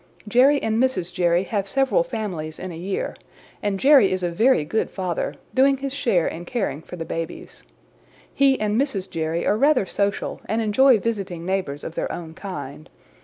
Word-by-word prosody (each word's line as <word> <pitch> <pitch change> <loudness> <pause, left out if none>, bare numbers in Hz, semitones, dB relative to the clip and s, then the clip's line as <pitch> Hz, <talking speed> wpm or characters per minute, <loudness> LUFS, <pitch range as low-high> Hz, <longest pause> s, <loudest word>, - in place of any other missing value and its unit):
"Jerry 260 +6 +5
and 225 +1 +1
Mrs. 255 -10 0
Jerry 175 -1 +2
have 200 -1 -2
several 270 - +2
families 180 - -5
in 185 0 -6
a - - -7
year, 185 +4 -3 0.5
and 205 -2 -1
Jerry 270 -6 +6
is 185 -1 -1
a 175 - 0
very 220 - +3
good 220 +9 -1
father, 180 -4 -3 0.2
doing 270 +1 +4
his 275 0 -4
share 235 - +1
in 170 - -5
caring 195 - -2
for 180 - -9
the 165 -2 -5
babies. 165 +1 -6 0.7
He 275 -1 +3
and 215 +3 +1
Mrs. 200 -10 -2
Jerry 165 -1 -2
are - - +3
rather 280 -3 +3
social 200 +1 -2
and 220 - -1
enjoy 235 +4 +5
visiting 195 -6 -3
neighbors 185 -7 -2
of 160 - -6
their - - -3
own 165 -2 -7
kind. 155 -6 -8
195 Hz, 180 wpm, -23 LUFS, 170-250 Hz, 0.7 s, Jerry